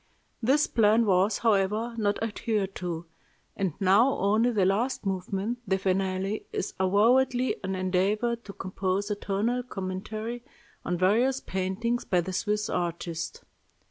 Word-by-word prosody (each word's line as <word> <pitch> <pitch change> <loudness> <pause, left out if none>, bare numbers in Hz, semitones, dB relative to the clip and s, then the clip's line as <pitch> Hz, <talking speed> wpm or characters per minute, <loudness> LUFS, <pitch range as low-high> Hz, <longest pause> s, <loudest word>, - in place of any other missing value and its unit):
This 270 +6 +3
plan 225 +1 +3
was, 195 +1 +3
however, 215 +1 +1
not 205 -3 0
adhered 210 -3 -1
to, 175 -2 -4 0.5
and 190 -6 -1
now 205 +8 +4
only 215 +5 +3
the 210 -6 +2
last 215 +6 0
movement 195 +4 -2
the 190 0 +2
finale 190 +1 -1
is - - -3
avowedly 245 +7 +3
an 190 0 -2
endeavor 195 +6 +1
to 230 -4 -12
compose 190 +2 -2
a - - +1
tonal 210 +5 -1
commentary 215 +2 -5 0.4
on 180 - -1
various 235 +9 +3
paintings 195 +6 -2
by 180 - +1
the 185 +2 -5
Swiss 210 +2 0
artist. 170 -2 -3
200 Hz, 135 wpm, -27 LUFS, 185-230 Hz, 0.5 s, now